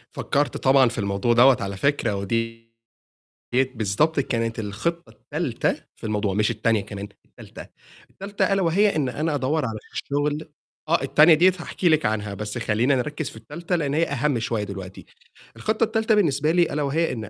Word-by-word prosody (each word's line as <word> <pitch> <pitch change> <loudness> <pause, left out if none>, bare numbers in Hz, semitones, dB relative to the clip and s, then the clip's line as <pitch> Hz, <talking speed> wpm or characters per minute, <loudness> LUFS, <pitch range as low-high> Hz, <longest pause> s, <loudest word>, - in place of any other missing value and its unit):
فكّرت 145 +1 -1
طبعًا 135 -2 +4
في 120 - -8
الموضوع 100 +3 0
دوَّة 125 +2 +6
على 100 -1 -4
فكرة، 120 -3 0
ودي 115 +3 -3 0.9
ديَّة 130 +1 +2
بالضبط 115 +9 +1
كانت 115 -4 -2
الخطة 170 - -3
التالتة - - -2 0.2
في - - -25
الموضوع، 105 -2 -1
مش 105 +3 +1
التانية 110 -1 +1
كمان، 100 0 -7 0.2
التالتة، - - -12 0.4
التالتة 195 0 -2
ألا 195 - +1
وهي 195 +4 +2
إن 140 -4 0
أنا 150 +3 -2
أدوّر 145 +2 0
على 110 -1 -4 0.2
شغل 145 +2 -2 0.4
آه، 165 -2 +2
التانية 155 +4 +6
ديَّة 180 +4 +5
هاحكي 175 +1 -1
لِك 155 -1 +3
عنها، 105 -1 -1
بس 105 +2 -5
خلّينا 120 +4 +1
نركِّز 150 +3 -3
في - - -14
التالتة 165 +10 -4
لإن 145 -5 -1
هي 160 +3 +2
أهَم 145 -3 -1
شوية 110 -1 -2
دلوقتي. 95 -2 -8 0.5
الخطة 215 +2 0
التالتة 220 0 +1
بالنسبة 155 -5 +2
لي 175 0 +4
ألا 150 - -1
وهي 160 +4 0
إن 110 -3 -6
135 Hz, 175 wpm, -23 LUFS, 110-155 Hz, 0.9 s, دوَّة